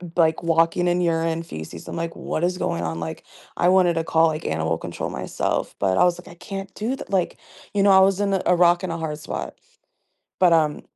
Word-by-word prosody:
like, 160 -2 +2
walking 165 +1 +2
in 175 +1 +2
urine, 165 -1 0
feces. 80 - -9
I'm - - -5
like, 165 0 -4
"What - - -3
is 180 0 -1
going 85 - -2
on?" 80 0 -3
Like, 80 -1 -6 0.3
I 175 - +3
wanted 180 -2 +4
to 165 - -1
call, 165 0 +4
like, 155 -1 -3
animal 80 0 -1
control - - -5
myself, - - -3
but 95 -1 +1
I - - +5
was 175 -1 +2
like, - - -12
"I 175 - -12
can't 195 +2 -7
do 235 +5 -2
th" - - -10
Like, 190 -3 0 0.4
you 200 -1 +2
know, 200 - +6
I 190 - +7
was 195 +1 +3
in 200 -1 +1
a 190 - +1
a 180 - +4
rock 175 0 +4
and 175 - -2
a 165 - -4
hard 155 -2 -4
spot. - - -6 0.9
But, 180 -2 +5
um, 155 -2 +2
170 Hz, 235 wpm, -23 LUFS, 160-185 Hz, 0.9 s, I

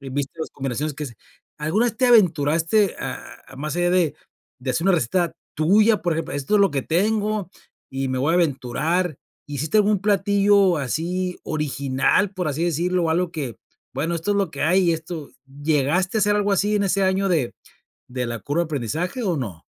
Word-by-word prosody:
y 135 - -8
viste 140 +1 -3
las - - -4
combinaciones 140 +2 -3
que 150 - -5
se 120 - -11 0.4
alguna 160 +10 +1
vez 230 - -3
te 255 - +3
aventuraste 170 -2 +3
a - - -4 0.3
a 130 - -13
más 155 +3 -4
allá 175 0 +2
de 180 -4 +2 0.4
de 130 0 -3
hacer 165 +9 -1
una 195 - +5
receta 165 +3 0 0.2
tuya, 210 +8 +4
por 175 -2 +1
ejemplo, 165 - -3
esto 145 +8 -1
es - - +4
lo 200 -4 +4
que 140 -1 -1
tengo 210 - 0 0.4
y 135 0 -2
me 130 - -2
voy 145 +5 +1
a - - +3
aventurar. 155 +2 0 0.3
¿Hiciste 145 +6 -2
algún 210 0 +3
platillo 200 -2 +3
así 175 +7 -2
original, 145 +5 0
por 185 -4 -2
así 150 +4 -1
decirlo?, 175 +1 0
algo 170 +1 0
que, 130 - -4 0.4
bueno, 170 +2 -2
esto 170 +5 -2
es 200 - 0
lo 195 -4 0
que 140 - -5
hay, 175 +1 +3
esto, 160 -2 -6 0.3
¿llegaste 160 +7 +1
a - - +1
hacer 205 +1 +3
algo 205 -1 +1
así 210 +2 +2
en 200 - +1
ese 195 +1 +1
año 190 +1 +1
de 155 -10 0 0.5
de 125 0 -3
la 120 0 -4
curva 145 +8 -1
de - - -3
aprendizaje 160 - -3
o 175 -5 0
no? 100 -11 -6
170 Hz, 195 wpm, -22 LUFS, 145-195 Hz, 0.5 s, una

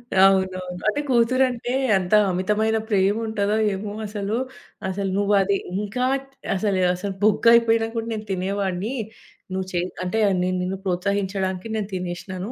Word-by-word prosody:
అవునవును. 190 -1 +3
అంటే 250 +7 +1
కూతురంటే 245 0 +2 0.2
ఎంత 185 0 -1 0.2
అమితమైన 210 +5 +1
ప్రేముంటదో 205 +1 +1 0.2
ఏమో 205 +2 -5
అసలు, 205 +1 -3 0.5
"అసలు 195 +1 -2
నువ్వు 205 0 +2
అది 200 +1 +1 0.2
ఇంకా 210 +5 -2 0.5
అసలు 190 -1 0
అసలు 195 +2 -4
బొగ్గయిపోయినా 230 +1 +5
కూడా 225 0 -2
నేను 215 -1 -5
తినేవాణ్ణి. 195 +3 -2 0.6
నువ్వు 190 0 -2
చె 175 - 0 0.2
అంటే 200 +5 -1 0.2
నేను 185 0 0
నిన్ను 185 +1 -2
ప్రోత్సహించడానికి 190 +1 -1
నేను 210 -2 -2
తినేశినాను. 180 +3 -4
200 Hz, 125 wpm, -23 LUFS, 185-220 Hz, 0.6 s, బొగ్గయిపోయినా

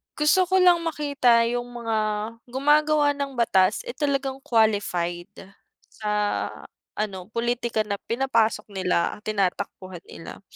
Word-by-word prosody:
Gusto 300 +5 +4
ko 375 0 +4
lang 355 -1 +6
makita 285 -7 +2
yung 245 0 -3
mga 225 -1 -1 0.5
gumagawa 295 +2 +3
ng 280 -1 -4
batas, 190 -5 +3
eh 485 - -6
talagang 275 -2 -1
qualified, 200 -5 0 0.6
sa 215 -1 -6 0.9
ano 190 -4 -4
pulitika 235 0 -1
na 200 - -1
pinapasok 230 -3 0
nila, 185 -3 0
tinatakbuhan 190 -3 -3
nila. 165 - -10
235 Hz, 115 wpm, -24 LUFS, 200-280 Hz, 0.9 s, lang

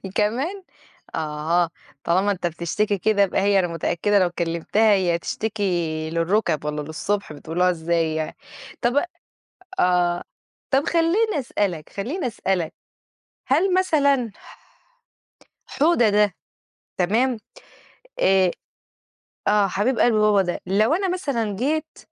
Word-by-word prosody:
كمان! 270 - -1 0.5
آه، 160 +2 0 0.3
طالما 190 +4 +2
أنت 180 -2 -2
بتشتكي 175 +5 -1
كده 200 +1 +2
يبقى 190 - 0
هي 200 0 +3
أنا 180 - +1
متأكدة 175 +5 +1
لو 180 -2 +2
كلمتها 175 +6 +1
هي 175 -3 +1
تشتكي 175 -7 -2
للرُكب 165 -2 0
والّا 150 0 -2
للصبح 160 +4 -3
بتقولوها 165 +5 0
إزاي 165 -1 0
يعني، 155 -1 -3 0.5
طَب 245 +6 +2 0.8
آه 175 -1 +2 0.5
طَب 275 +2 +3
خلّيني 345 +3 +2
أسألك 195 - -2
خلّيني 260 - -3
أسألك، 190 -7 -2 0.7
هل 380 +1 +2
مثلًا 280 - +2
ح - - -17 1.2
حوده 300 -9 +4
ده 205 -2 +2 0.6
تمام؟ 230 +8 +2 0.8
آآ، 190 -1 +4 1.0
آه، 205 -1 +4
حبيب 210 +7 0
قلبْ 240 - +4
بابا 210 -2 +4
ده، 175 -1 -3
لو 215 - +3
أنا 380 +2 0
مثلًا 250 - -2
جيت 310 +6 -2
200 Hz, 115 wpm, -23 LUFS, 170-240 Hz, 1.2 s, حوده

